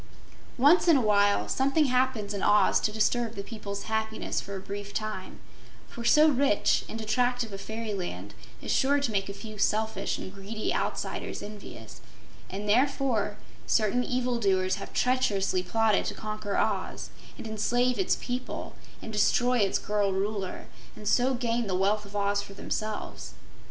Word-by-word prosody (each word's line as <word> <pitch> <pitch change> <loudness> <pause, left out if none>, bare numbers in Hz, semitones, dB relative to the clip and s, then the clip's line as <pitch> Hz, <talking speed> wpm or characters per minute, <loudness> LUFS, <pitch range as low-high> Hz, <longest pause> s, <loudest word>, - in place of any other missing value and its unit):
Once 295 +9 +5
in 325 -4 +7
a - - +2
while 205 -2 +3
something 275 +3 +2
happens 250 -5 +1
in 200 - -3
Oz 205 -2 +4
to 210 - 0
disturb 225 +2 0
the 200 - -5
people's 200 -2 -6
happiness 220 0 -2
for 200 - -7
a - - -4
brief 200 +1 -7
time, 215 -3 -4 0.5
for 235 - -8
so 300 +6 +6
rich 275 -7 +3
and 225 - -5
attractive 240 +1 0
a - - -4
fairyland 195 - -5 0.3
is - - -2
sure 280 +2 +3
to 280 -5 -1
make 195 -1 -1
a - - -2
few 215 0 -9
selfish 220 +2 0
and 185 - -7
greedy 200 +2 -3
outsiders - - -3
envious, 160 - -10 0.5
and 200 +2 -5
therefore 240 -3 +2 0.3
certain 225 +3 +2
evil 250 -1 -1
doers 190 -2 +2
have 200 - -8
treacherously 205 -7 +1
plotted 215 +3 +2
to - - -3
conquer 215 -1 -4
Oz - - -1 0.3
and - - -8
enslave 245 +3 +1
its 380 - +2
people 250 +1 -4 0.3
and 220 - -7
destroy 245 +4 +3
its 200 -2 +2
girl 205 -1 0
Ruler, 195 0 -3 0.3
and 210 - -8
so 255 +4 +3
gain 235 -2 -1
the 185 - 0
wealth 205 +3 +1
of 200 +1 -12
Oz 200 0 +1
for 200 -1 -11
themselves. 215 +1 -4
215 Hz, 160 wpm, -28 LUFS, 200-245 Hz, 0.5 s, in